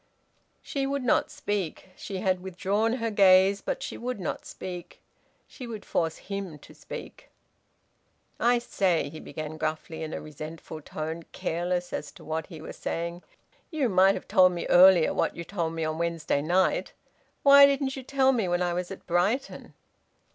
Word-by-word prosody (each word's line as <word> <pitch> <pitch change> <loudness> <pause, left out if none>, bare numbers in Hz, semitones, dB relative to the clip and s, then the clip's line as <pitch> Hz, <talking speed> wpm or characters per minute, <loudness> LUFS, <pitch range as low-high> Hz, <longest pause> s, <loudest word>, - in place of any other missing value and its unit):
She 275 -1 -2
would 280 -1 -2
not 245 - +2
speak. 190 -3 -4
She 195 - -6
had 185 -2 +1
withdrawn 195 +4 0
her 230 -3 -2
gaze, 195 -1 +5
but - - -3
she - - -6
would 250 -2 -4
not 180 - -4
speak. 180 -2 -8 0.5
She 250 - -9
would 220 -3 -7
force 165 -2 -1
him 195 -5 -6
to - - -16
speak. - - -10 1.1
"I 240 +1 +4
say," 190 -9 0
he 155 +1 -9
began 155 0 -7
gruffly, 155 +1 -3
in 160 -1 -4
a - - -4
resentful 155 +1 -8
tone, 160 +3 -5
careless 175 +1 -2
as 150 - -4
to - - -14
what 160 0 -3
he 160 -5 -10
was - - -8
saying, 170 +1 -4 0.5
"you 300 -7 0
might 190 0 +5
have - - -7
told 185 -3 +5
me 175 - -4
earlier 180 -2 +7
what - - 0
you 170 - -5
told 170 -3 -3
me 165 -1 -3
on 155 +1 -3
Wednesday 165 -4 0
night. 180 +5 +1 0.5
Why 280 -1 +9
didn't 275 -1 0
you 265 - -6
tell 265 +1 +2
me 230 -7 0
when 175 0 +1
I 175 -1 0
was 180 0 -3
at 195 - -9
Brighton?" 195 +10 -1
185 Hz, 175 wpm, -27 LUFS, 165-220 Hz, 1.1 s, Why